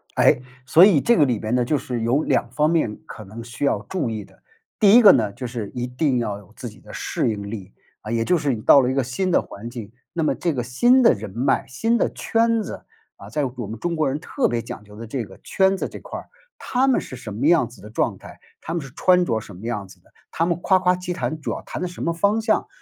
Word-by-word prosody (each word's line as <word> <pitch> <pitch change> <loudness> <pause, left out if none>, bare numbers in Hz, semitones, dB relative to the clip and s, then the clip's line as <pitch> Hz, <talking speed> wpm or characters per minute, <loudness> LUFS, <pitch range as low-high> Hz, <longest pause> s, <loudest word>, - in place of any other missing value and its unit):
哎， 125 - +4 0.2
所 160 +7 +7
以 190 -8 +5
这 235 - +3
个 150 - +5
里 125 -5 0
边 110 +3 -2
呢， 125 -1 +2
就 145 +4 +1
是 125 -3 -4
有 125 +6 +2
两 120 - 0
方 150 +5 +1
面 155 -11 0
可 110 - -9
能 110 +4 -9
需 115 +4 -6
要 140 - +2
注 170 -11 -2
意 110 -2 -5
的。 - - -22 0.4
第 200 -2 +6
一 245 - +8
个 205 - +10
呢， 105 -4 +1
就 125 - -6
是 115 -4 -5
一 125 -1 -2
定 125 +1 0
要 105 -4 -2
有 100 -3 -17
自 - - -7
己 - - -15
的 - - -14
适 - - -1
应 100 -2 -5
力， 100 -3 -7 0.3
啊， 105 - -7
也 115 0 0
就 180 - +3
是 145 -4 0
你 115 - -3
到 140 - +7
了 125 - +1
一 - - -1
个 135 - +2
新 130 +10 -2
的 - - +4
环 115 +4 -9
境， 115 -4 -8 0.2
那 170 - -2
么 155 - +1
这 170 - -1
个 125 -4 -2
新 240 - +4
的 235 - +6
人 105 0 -7
脉、 120 +7 0
新 225 - 0
的 - - +1
圈 230 -1 +1
子， - - -8 0.3
啊， 100 - -12
在 140 +5 0
我 125 -3 -6
们 110 +2 -7
中 170 -1 -2
国 155 -2 +1
人 140 +3 -2
特 260 - 0
别 120 - -1
讲 115 -2 -8
究 105 0 -15
的 115 +1 -8
这 120 +1 -3
个 95 -2 -14
圈 190 0 +2
子 - - -2
这 - - -9
块 - - -8
儿。 - - -17 0.4
他 255 +2 +1
们 265 - +3
是 130 - -9
什 115 -4 -8
么 130 +8 +1
样 165 -8 +4
子 120 - -16
的 105 - -11
状 - - -1
态， - - -13 0.2
他 165 - -6
们 170 - -1
是 135 -3 -10
穿 180 +1 +4
着 110 -9 -1
什 100 -3 -12
么 105 - -9
样 105 -5 -3
子 - - -17
的， - - -28 0.2
他 165 - 0
们 170 -1 -1
夸 190 - +4
夸 180 0 +3
其 180 0 -4
谈 160 -2 -3
主 - - -4
要 - - -3
谈 - - -6
的 180 - -1
什 175 - -7
么 170 - +1
方 200 +6 +1
向。 220 0 +1
130 Hz, 300 characters per minute, -22 LUFS, 115-175 Hz, 0.4 s, 个